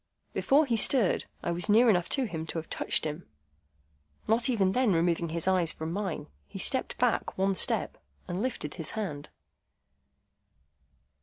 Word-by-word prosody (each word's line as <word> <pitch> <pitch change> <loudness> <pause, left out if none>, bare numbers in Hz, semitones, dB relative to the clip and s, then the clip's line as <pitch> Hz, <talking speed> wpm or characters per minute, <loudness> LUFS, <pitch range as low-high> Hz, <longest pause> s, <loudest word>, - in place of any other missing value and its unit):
Before 290 +3 +3
he 240 -4 0
stirred, 220 -2 +2 0.2
I 170 - -1
was 175 +4 -2
near 230 +4 +6
enough 180 -6 +2
to 270 - +2
him 160 -8 -5
to 165 - -4
have 160 - -6
touched - - 0
him. 155 +3 -5 1.0
Not 230 +4 +4
even 200 -6 +2
then 250 -2 +2
removing 170 0 +1
his 165 +2 -2
eyes 180 -3 +3
from 160 +1 -6
mine, 195 -2 -3 0.2
he - - -9
stepped - - +1
back - - 0
one 195 +1 +2
step, - - -1 0.3
and 180 +3 -3
lifted 220 - -3
his 160 - -5
hand. 150 -9 -4
185 Hz, 160 wpm, -29 LUFS, 165-220 Hz, 1.0 s, near